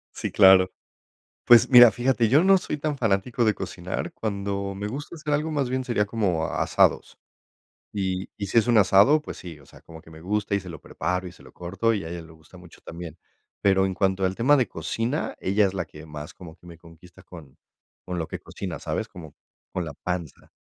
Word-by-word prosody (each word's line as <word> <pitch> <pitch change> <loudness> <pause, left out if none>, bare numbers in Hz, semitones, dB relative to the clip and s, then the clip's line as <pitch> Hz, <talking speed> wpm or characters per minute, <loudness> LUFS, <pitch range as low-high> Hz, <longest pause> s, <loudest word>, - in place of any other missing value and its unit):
Sí, - - -4
claro. 95 -1 +6 0.7
Pues, 120 -1 +7
mira, 120 -3 +9
fíjate, 120 0 +1
yo 140 +9 +4
no 195 0 +6
soy 175 -4 -4
tan 150 -1 -3
fanático 115 +2 0
de 110 - +3
cocinar. 90 -2 -5
Cuando 100 -2 -4
me 100 +1 -4
gusta 145 +8 -7
hacer 150 -2 -3
algo, 150 +2 0
más 140 -4 -1
bien 130 0 -2
sería 110 -4 0
como 100 -7 -1
a - - -3
asados. - - +1 0.8
Y 95 -2 -3
y 100 - -4
si 115 - +2
es 115 - +2
un 120 -2 +5
asado, 105 +9 +5
pues - - -8
sí, 85 -4 -10
o 70 - -19
sea, - - -17
como 80 -1 -13
que 80 - -18
me 80 - -13
gusta 105 +3 -2
y 100 - +1
se 95 - -11
lo 85 - -9
preparo 90 0 -3
y 90 - -9
se - - -18
lo - - -16
corto, 95 +6 -1
y 100 - -3
a - - -6
ella 85 0 -6
le 80 - -15
gusta 80 +2 -18
mucho 90 -1 -16
también. 85 -1 -9 0.4
Pero 95 -1 +3
en 95 - -1
cuanto 95 0 0
al 95 +1 -1
tema 140 +5 +4
de 130 -4 +1
cocina, 120 +7 -3
ella 100 +2 +2
es 95 - -4
la 90 -3 -3
que 75 0 -13
más 75 -1 -9
como 80 -4 -12
que - - -20
me 85 -2 -12
conquista 85 +1 -17
con 80 -7 -14 0.5
con 90 -1 -5
lo 80 - -4
que - - -6
cocina, 95 -4 -7
¿sabes?, - - -4
como 80 -5 -12 0.4
con 90 - -3
la 80 - -6
panza. 85 -1 -6
95 Hz, 225 wpm, -25 LUFS, 85-115 Hz, 0.8 s, mira